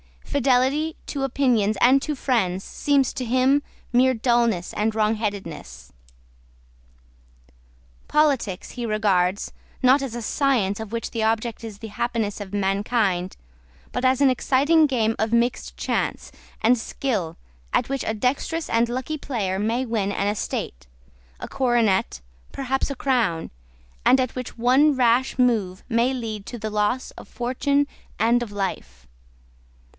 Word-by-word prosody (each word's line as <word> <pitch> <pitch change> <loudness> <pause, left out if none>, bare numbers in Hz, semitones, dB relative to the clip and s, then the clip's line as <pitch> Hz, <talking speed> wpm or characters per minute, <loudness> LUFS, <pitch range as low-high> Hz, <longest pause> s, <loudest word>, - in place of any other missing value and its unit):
Fidelity 280 +3 +1
to 280 -2 -3
opinions 240 -6 +1
and 260 +3 +6
to 300 +1 -3
friends 195 -9 0
seems 280 -3 +1
to 255 - -4
him 260 +4 +3 0.3
mere 255 +1 +4
dulness 235 -6 +1
and 215 +1 0
wrongheadedness. 200 - -3 2.2
Politics 275 -11 +1
he 240 -2 -5
regards, 200 -3 +1 0.3
not 260 +3 +5
as 260 -4 -4
a 240 - -4
science 225 -6 +1
of 220 -2 -7
which 230 - -3
the 230 - -3
object 225 +1 -1
is 210 -3 -9
the 225 - -7
happiness 225 -1 -2
of 205 -1 -8
mankind, 195 -2 0 0.6
but 250 - -2
as 255 +1 +3
an 275 - +6
exciting 290 +5 +3
game 225 -5 0
of 220 +1 0
mixed 235 +1 0
chance - - -2 0.3
and 240 +3 +4
skill, 205 -9 -3 0.4
at - - +1
which 275 -2 -2
a 220 - 0
dexterous 275 +8 -1
and 230 +1 +2
lucky 255 +6 -3
player 205 -10 -2
may 230 +5 0
win 215 -4 -1
an 200 - -1
estate, 65 - -3 0.5
a - - -5
coronet, 235 - +1 0.3
perhaps 270 0 -1
a 280 - -4
crown, 235 -12 0 0.5
and 260 - +6
at 255 -2 -1
which 250 -2 -6
one 265 +5 +4
rash 250 +1 +2
move 215 -7 +1
may 235 +2 +2
lead 220 -5 -5
to 240 - -7
the 215 -1 -4
loss 210 +5 0
of - - -12
fortune 280 +4 0 0.3
and 235 +3 +3
of 235 -3 -5
life. 65 - -4
235 Hz, 140 wpm, -23 LUFS, 210-260 Hz, 2.2 s, and